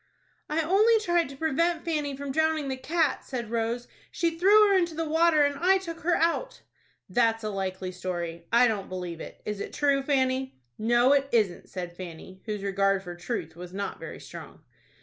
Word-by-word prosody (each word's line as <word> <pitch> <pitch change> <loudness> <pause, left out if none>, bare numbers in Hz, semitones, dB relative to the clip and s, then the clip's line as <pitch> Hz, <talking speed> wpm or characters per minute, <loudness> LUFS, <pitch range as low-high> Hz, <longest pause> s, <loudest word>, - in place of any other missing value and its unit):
"I 315 +2 +1
only 425 +7 +4
tried 345 -6 +1
to 275 - -9
prevent 325 +3 0
Fanny 295 -4 -2
from 280 0 -4
drowning 315 -1 +1
the 265 - -1
cat," 315 +2 0
said 235 -4 -5
Rose. 235 +1 -1 0.2
"She 335 -2 -1
threw 410 +5 +6
her - - +4
into 345 -3 +1
the 325 0 -2
water, 320 -1 +4
and 285 -1 0
I 380 +2 +4
took 335 -3 -7
her 345 +1 +1
out." 335 +9 0 0.5
"That's 225 +2 +1
a 215 - -2
likely 190 -1 -3
story. 175 -2 -5
I 240 +2 +6
don't 210 -4 -2
believe 180 -3 -5
it. - - -10
Is 210 -1 -3
it - - -6
true, 280 -2 +2
Fanny?" 265 - 0 0.2
"No, 240 +4 +4
it 275 -1 +2
isn't," 210 -7 +1
said 175 -2 -6
Fanny, 185 +1 -9
whose 210 -2 -3
regard 195 0 +1
for 175 -2 -7
truth 175 -3 -5
was 180 +1 -9
not 200 +1 -4
very - - -8
strong. - - -11
260 Hz, 190 wpm, -27 LUFS, 195-325 Hz, 0.5 s, threw